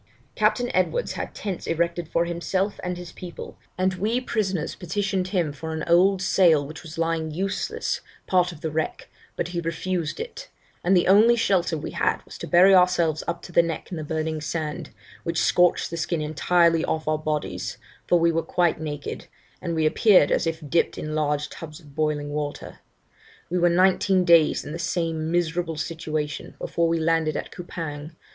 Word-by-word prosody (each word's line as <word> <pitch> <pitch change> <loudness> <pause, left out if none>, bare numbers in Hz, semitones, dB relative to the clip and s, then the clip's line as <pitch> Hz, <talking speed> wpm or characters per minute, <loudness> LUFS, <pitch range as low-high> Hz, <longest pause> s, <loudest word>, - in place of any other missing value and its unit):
Captain 245 -1 +1
Edwards 335 - +1
had - - -5
tents 195 -4 -5
erected 170 0 -1
for 170 +1 +1
himself 185 +4 -2
and 180 0 -3
his 175 -1 -8
people, 175 -2 -9 0.2
and 185 +1 +1
we 215 +7 0
prisoners 195 -9 -2
petitioned 190 +1 -2
him 175 -6 0
for 160 +3 -6
an 160 - -3
old 185 +3 +4
sail 165 -7 +4
which 155 +3 -9
was 160 -1 -10
lying 165 -1 0
useless, 190 +6 -2 0.2
part 180 -1 +2
of 165 -3 -12
the 160 - -3
wreck, 160 +1 -3 0.3
but 170 - -2
he 175 -1 -3
refused 165 0 -2
it; 480 +2 -7 0.3
and 185 +1 +4
the 175 - +2
only 215 +5 +6
shelter 185 -7 +1
we - - -6
had - - 0
was - - -11
to - - -6
bury 185 +3 +6
ourselves 180 -4 +3
up 170 - -3
to - - -10
the 170 - +6
neck 170 +1 -5
in 175 - -4
the 155 - -4
burning 155 0 -2
sand, 155 +1 -4 0.3
which 170 -1 -2
scorched 175 -1 +3
the 170 - -4
skin 165 0 -1
entirely 165 +2 +2
off 155 -1 -2
our 155 0 +1
bodies, 155 -1 -3 0.3
for 175 - +4
we 170 0 +3
were 165 0 +1
quite 170 -1 +1
naked, 145 -2 -5 0.3
and 170 -2 -2
we 160 -1 +1
appeared 180 0 +5
as - - +1
if 160 -2 -4
dipped 165 +4 +1
in 155 - -4
large 150 -1 0
tubs 155 0 -9
of 145 -4 -17
boiling 150 -1 -1
water. 145 -1 -5 0.7
We 180 - +1
were 175 0 +4
nineteen 185 +1 +3
days 170 -3 +5
in 145 - -6
the 165 - -5
same 165 -2 -1
miserable 170 -1 -1
situation 155 -2 -4
before 170 0 0
we 165 0 +1
landed 160 -1 +1
at - - -5
Coupang. 160 -3 -7
170 Hz, 185 wpm, -24 LUFS, 155-180 Hz, 0.7 s, only